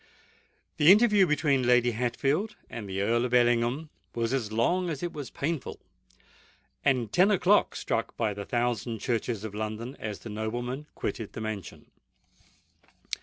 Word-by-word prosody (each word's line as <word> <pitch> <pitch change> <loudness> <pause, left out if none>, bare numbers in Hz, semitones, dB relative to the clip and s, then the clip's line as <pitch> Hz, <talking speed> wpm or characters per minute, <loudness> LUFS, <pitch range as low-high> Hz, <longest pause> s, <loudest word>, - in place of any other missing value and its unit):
The 155 +2 +7
interview 210 -2 +6
between 145 -3 +2
Lady 125 0 +4
Hatfield 135 - -1 0.2
and 105 -4 -6
the 95 +1 -2
Earl 120 +3 +2
of 125 0 0
Ellingham 120 +5 +2 0.2
was 115 +1 -1
as 115 -6 -1
long 175 +12 +1
as 150 -2 -4
it 175 - -3
was 145 -5 -6
painful: 155 0 -3 1.0
and 125 -6 +1
ten 185 +3 +5
o'clock 200 0 +3
struck 115 - -2
by 110 -3 0
the 100 0 -6
thousand 120 0 -1
churches 115 -2 -2
of 110 -2 -6
London, 110 +4 -4
as 105 -2 -4
the 115 - -8
nobleman 120 +6 -4
quitted 110 -5 -4
the - - -6
mansion. 110 -4 -6
120 Hz, 150 wpm, -28 LUFS, 110-150 Hz, 1.0 s, The